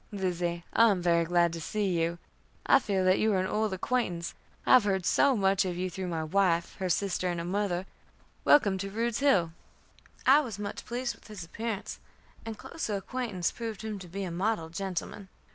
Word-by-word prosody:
"Lizzie, 175 -3 -2
I 230 0 +6
am 195 -3 +2
very 170 -1 +3
glad 170 0 +2
to 165 - -5
see 210 +6 -1
you. 170 -2 0 0.5
I - - +6
feel 195 -7 0
that 185 +1 +4
you 220 -1 +2
are 190 - +2
an 185 - 0
old 215 +2 0
acquaintance, 185 -4 -1 0.3
I - - +5
have 255 -3 +8
heard 190 -3 0
so 275 -4 +4
much 195 -1 +3
of 180 -2 -3
you 185 0 -2
through 185 +1 -4
my 165 -2 -2
wife, 170 0 +1
her 185 -1 -1
sister, 185 +1 0
and 175 -1 -2
her 170 - -4
mother. 190 -1 -1 0.6
Welcome 200 -9 +5
to 195 +1 -3
Rude's 230 +2 -1
Hill." 230 - +3 0.7
I 270 +3 +7
was 235 -9 -4
much 205 0 -5
pleased 245 +1 -2
with - - -18
his 210 -5 -7
appearance, 215 +4 -5 0.5
and 220 -1 -5
closer 220 -7 -4
acquaintance 200 -3 -2
proved 225 -3 -6
him 215 -2 -4
to 185 - -9
be 195 +3 -5
a 180 - -4
model 180 -1 -1
gentleman. 190 +2 -5
190 Hz, 200 wpm, -29 LUFS, 175-215 Hz, 0.7 s, have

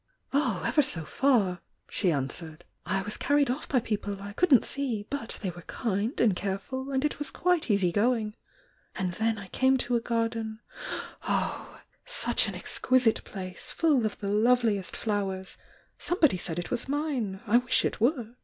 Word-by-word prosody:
"Oh, 250 - +1
ever 300 - +4
so 175 - -1
far!" 210 - +2 0.3
she 185 -5 +1
answered. 155 +3 -3 0.2
"I 195 0 0
was 210 +1 -4
carried 285 -2 +2
off 265 - -5
by 260 - +3
people 205 -3 -3
I 200 +1 -7
couldn't 280 - +5
see 250 -7 -2
— - - -40
but 280 -5 -3
they 190 - -1
were 175 0 -11
kind 210 +5 -2
and 215 -6 +4
careful, 205 +9 -3
and 265 +1 +1
it 300 - -1
was 295 - -3
quite 360 -6 +1
easy 195 -4 +3
going. 215 +1 +1 0.6
And 185 -1 -1
then 220 +3 0
I 200 -2 -9
came 265 0 +3
to 245 -1 0
a 235 - +2
garden 230 -1 -1 0.3
— - - -7
oh! - - -2
— - - -33
such - - +1
an - - -4
exquisite 250 -3 +2
place, 185 -2 -6
full 300 -7 +3
of 215 -2 -1
the 200 - -5
loveliest 220 -2 +2
flowers— 195 -3 -2 0.4
somebody 320 - +3
said 170 -2 -3
it 175 - -4
waa - - +1
mine! 265 -9 -2
I 230 +2 +5
wish 250 0 +3
it - - -2
were!" 240 -2 +1
225 Hz, 180 wpm, -28 LUFS, 195-260 Hz, 0.6 s, couldn't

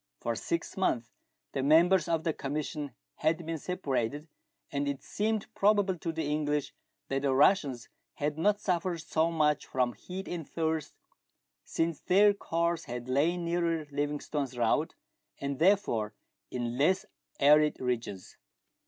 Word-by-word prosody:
For 115 - -2
six 170 +8 -3
months 120 -11 0 0.4
the 135 - -2
members 165 +5 +5
of 165 -1 0
the 160 - 0
commission 145 -1 -4 0.2
had 160 +1 0
been 165 -1 -3
separated, 145 -4 -2 0.4
and 140 0 -1
it 140 -1 -3
seemed 215 0 -1
probable 200 -2 +3
to 165 -1 -2
the 160 0 -3
English 150 -1 -1 0.4
that 135 0 0
the 135 -2 +1
Russians 140 -5 +3 0.3
had 150 0 -1
not 205 +6 +2
suffered 175 -3 -1
so 160 0 +1
much 150 -3 +1
from 125 -2 0
heat 185 - -7
and 170 -4 -5
thirst, 160 -2 -2 0.7
since 165 -1 -1
their 205 +3 +5
course 170 -3 -1
had 120 0 -6
lain 165 +7 +1
nearer 170 -2 0
Livingstone's 145 -2 -2
route, 115 -2 +1 0.4
and 140 -1 -3
therefore 155 - +2 0.3
in 120 0 -3
less 185 +7 +3 0.3
arid 150 +2 +5
regions. 115 -7 -3
155 Hz, 140 wpm, -30 LUFS, 140-170 Hz, 0.7 s, members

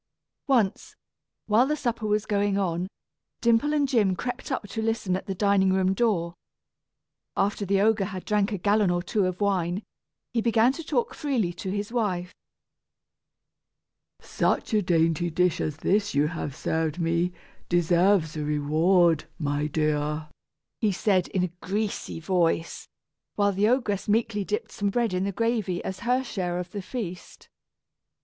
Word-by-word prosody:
Once, 230 -8 +1 0.5
while 225 +5 +4
the 300 - +1
supper 235 -6 -2
was 210 0 +1
going 205 -1 +1
on, 180 -2 -1 0.5
Dimple 235 +5 +3
and 295 -2 +2
Jim 210 -8 +2
crept 245 +8 -5
up 255 -5 -2
to 225 - -3
listen 220 -4 0
at 190 - -5
the 195 - -3
dining 200 -1 +3
room 190 0 +2
door. 190 -6 0 1.0
After 200 0 0
the 195 +1 +2
ogre 215 -1 +3
had 190 -2 -6
drank 210 0 +1
a 205 - -1
gallon 205 +1 +2
or 175 0 0
two 195 0 +1
of 185 0 -4
wine, 190 -1 0 0.5
he 230 - +1
began 230 +2 +3
to 330 - -7
talk 265 -6 -1
freely 240 -12 -1
to 185 +2 -6
his 205 +2 -3
wife. 185 -7 -1 1.9
"Such - - -1
a 215 - +4
dainty 165 -1 +2
dish 180 +1 +1
as 150 -1 -2
this 205 +2 +1
you 145 +1 +3
have 155 -5 -5
served 160 -1 -1
me 170 +1 +1 0.4
deserves 175 -1 +3
a 155 - -3
reward, 155 +3 +3
my 145 -1 -1
dear," 150 0 -1 0.5
he 215 -3 +2
said 190 -1 +1
in 185 - -1
a 180 -2 -3
greasy 205 -3 -3
voice, 165 -1 0 0.5
while 200 -1 +3
the 200 +2 +2
ogress 225 -5 0
meekly 215 -1 +1
dipped 210 +2 -3
some 200 -1 -1
bread 230 0 0
in 185 +1 0
the 200 - -1
gravy 220 -4 -1
as 190 0 -5
her 250 +2 +1
share 180 -7 -3
of 180 0 -5
the 205 - -4
feast. 185 -4 -7
195 Hz, 160 wpm, -26 LUFS, 175-215 Hz, 1.9 s, while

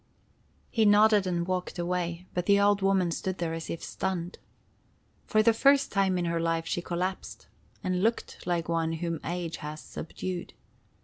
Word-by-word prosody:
He 225 - +2
nodded 210 -1 +5
and 170 -1 0
walked 185 0 -3
away; 175 0 -2
but 180 0 -2
the 200 0 +5
old 200 0 +3
woman 190 -3 +2
stood 185 +2 -3
there 165 -1 -2
as 165 0 -5
if 165 - -5
stunned. 180 -2 -3 0.9
For 215 0 +3
the 230 +1 +5
first 275 +4 +4
time 195 -2 +2
in 175 - 0
her 170 0 0
life 165 0 0
she 175 - -2
collapsed, 185 +2 -4 0.4
and 185 -1 0
looked 225 -3 -1
like 170 -2 0
one 165 -1 0
whom 165 -1 -3
age 170 -1 -3
has 150 0 -6
subdued. 175 +3 -6
180 Hz, 170 wpm, -28 LUFS, 170-195 Hz, 0.9 s, nodded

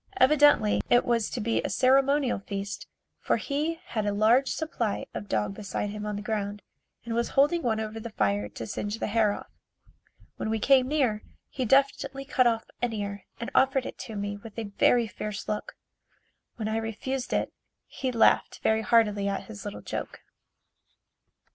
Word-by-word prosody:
Evidently 290 - +5
it 245 - +5
was 235 -3 +1
to - - -4
be 230 +1 0
a - - -3
ceremonial 270 -1 +3
feast 200 0 -5 0.3
for - - +1
he 305 +4 -2
had 215 -2 -2
a 205 - 0
large 225 +6 +4
supply 240 -10 -2
of 110 -3 -6
dog 105 -2 0
beside 200 - -4
him 210 0 -5
on 210 - -2
the 205 - -5
ground 205 -1 -3 0.4
and 235 - -3
was 235 +1 0
holding 295 +5 +4
one 225 -6 0
over 220 0 -4
the 230 +1 -6
fire 105 - 0
to 115 - -7
singe 205 - -4
the - - -2
hair 215 -1 +2
off. - - -7 0.9
When - - -3
we 220 - +1
came 255 +3 +4
near, 260 -8 +1 0.3
he 260 - -3
deftly 275 +1 +2
cut 255 -2 +3
off 225 -1 0 0.2
an 245 -2 0
ear 200 -2 -4
and 235 - -5
offered 265 -1 +3
it - - -7
to 220 - -7
me 205 0 -3
with 220 +1 -12
a 215 -3 -5
very 240 -1 +5
fierce 210 0 -6
look. 210 0 -4 0.8
When 220 -2 -3
I 220 +1 0
refused 235 +4 -3
it, - - 0 0.3
he 260 -2 -3
laughed 230 -2 +3
very 220 0 +3
heartily 210 -3 +3
at 200 0 -2
his 205 -3 -10
little 205 - -6
joke. - - -6
225 Hz, 180 wpm, -27 LUFS, 205-255 Hz, 0.9 s, Evidently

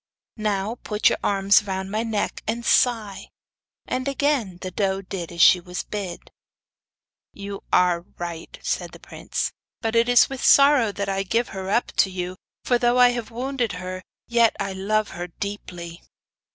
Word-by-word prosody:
'Now 215 +1 -2
put 210 0 +2
your - - -2
arms 200 +1 +4
round 190 0 -3
my 215 +1 0
neck, 225 -3 -2
and 235 +2 -2
sigh.' 220 -6 +1 0.6
And 255 +1 -2
again 275 -9 0
the 185 - -5
doe 195 0 -1
did 180 -2 -6
as 170 -1 +3
she 180 - +7
was 180 +1 -5
bid. 195 -4 -6 1.0
'You 200 0 -7
are 180 -1 +3 0.2
right,' 170 -1 -6
said - - -2
the - - -11
prince; - - -4 0.3
'but 225 -1 -2
it 230 +1 +3
is 245 -1 +6
with 270 -1 -6
sorrow 275 -6 +6
I 195 -1 -1
give 230 +5 0
her 190 0 -6
up 235 +4 +1
to 195 - +4
you, 185 -1 -4 0.3
for 245 -1 +2
though 240 0 +2
I 250 0 +7
have 240 -3 -3
wounded 245 -1 -2
her 185 +1 -6 0.3
yet 235 -1 +3
I 195 - -2
love 210 +3 0
her 175 +1 -6
deeply. 175 -2 -7
200 Hz, 165 wpm, -23 LUFS, 185-235 Hz, 1.0 s, she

